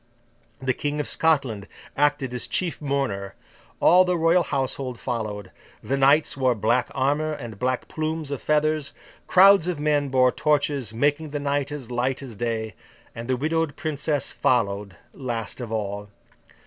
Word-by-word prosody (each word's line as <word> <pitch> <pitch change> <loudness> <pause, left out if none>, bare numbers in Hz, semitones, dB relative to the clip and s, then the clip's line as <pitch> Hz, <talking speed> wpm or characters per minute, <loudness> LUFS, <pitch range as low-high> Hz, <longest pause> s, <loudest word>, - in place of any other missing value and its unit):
The 130 0 0
King 145 +2 -3
of 150 - -2
Scotland 135 -11 +1 0.3
acted 145 -3 +1
as 125 0 -3
chief 170 +8 -2
mourner, 135 -9 -2 0.4
all 180 +1 +6
the 180 -1 0
Royal 165 +2 +4
Household 135 -4 -2
followed, 105 -6 -4 0.3
the 130 +6 -1
knights 140 +3 +4
wore 130 -3 +2
black 115 +3 +1
armour 145 +4 +1
and 115 -8 -8
black 130 0 -1
plumes 155 -1 -3
of 140 - -4
feathers, 150 -1 +1 0.3
crowds 195 -1 +6
of 175 -4 -2
men 145 -1 +1
bore 130 -1 +4
torches, 145 -5 0
making 145 +6 0
the 145 0 -3
night 140 0 -1
as 135 -5 -7
light 125 +3 -1
as 125 -5 -9
day; 110 -1 -2 0.4
and 115 +1 -7
the 130 -1 +1
widowed 160 +2 0
Princess 150 -2 -2
followed 100 -5 0 0.2
last 120 -2 -4
of 115 -3 -6
all. 105 -1 -3
135 Hz, 155 wpm, -24 LUFS, 120-150 Hz, 0.4 s, all